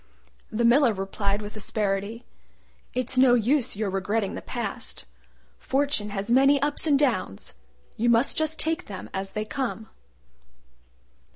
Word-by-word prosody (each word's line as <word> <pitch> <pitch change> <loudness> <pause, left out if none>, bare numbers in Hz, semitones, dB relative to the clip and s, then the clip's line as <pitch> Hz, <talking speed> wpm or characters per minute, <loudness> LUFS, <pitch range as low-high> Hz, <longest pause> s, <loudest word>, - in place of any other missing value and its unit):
The 235 +1 0
Miller 240 -1 +5
replied 200 +1 -2
with 205 +1 -8
asperity, 210 +2 -2 0.7
"It's 255 +1 +1
no 255 -2 +6
use 245 +2 +1
your 205 -1 -2
regretting 195 +2 -1
the - - -6
past. - - -4 0.5
Fortune 275 -6 0
has 200 +2 -3
many 275 +3 +5
ups 290 +3 0
and 290 -2 +4
downs: 230 - -1 0.4
you 240 +2 +2
must 235 +3 +4
just 315 0 0
take 325 +3 -2
them 195 -2 -8
as 195 0 -4
they 215 0 -2
come." 225 -2 -4
230 Hz, 135 wpm, -26 LUFS, 205-270 Hz, 0.7 s, no